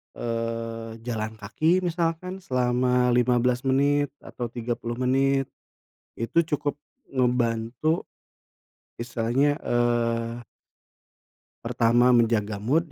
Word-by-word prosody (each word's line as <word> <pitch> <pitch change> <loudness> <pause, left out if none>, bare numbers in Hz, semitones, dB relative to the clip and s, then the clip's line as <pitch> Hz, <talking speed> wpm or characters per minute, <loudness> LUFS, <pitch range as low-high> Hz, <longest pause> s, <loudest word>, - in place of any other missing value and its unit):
eee, 115 -1 -3
jalan 110 -2 -3
kaki, 155 - +1
misalkan 175 +2 -2
selama 125 -3 +1
15 125 +1 +2
menit 145 +2 +3 0.2
atau 120 - -5
30 120 0 -4
menit, 135 +2 +2 0.8
itu 165 +9 +2
cukup 145 -1 -1 0.3
ngebantu. 125 +4 0 0.9
Misalnya, 120 +5 +1
eee 120 -1 0 1.2
pertama 120 +2 +3
menjaga 110 -4 +2
mood, 150 +9 0
125 Hz, 85 wpm, -25 LUFS, 115-135 Hz, 1.2 s, menit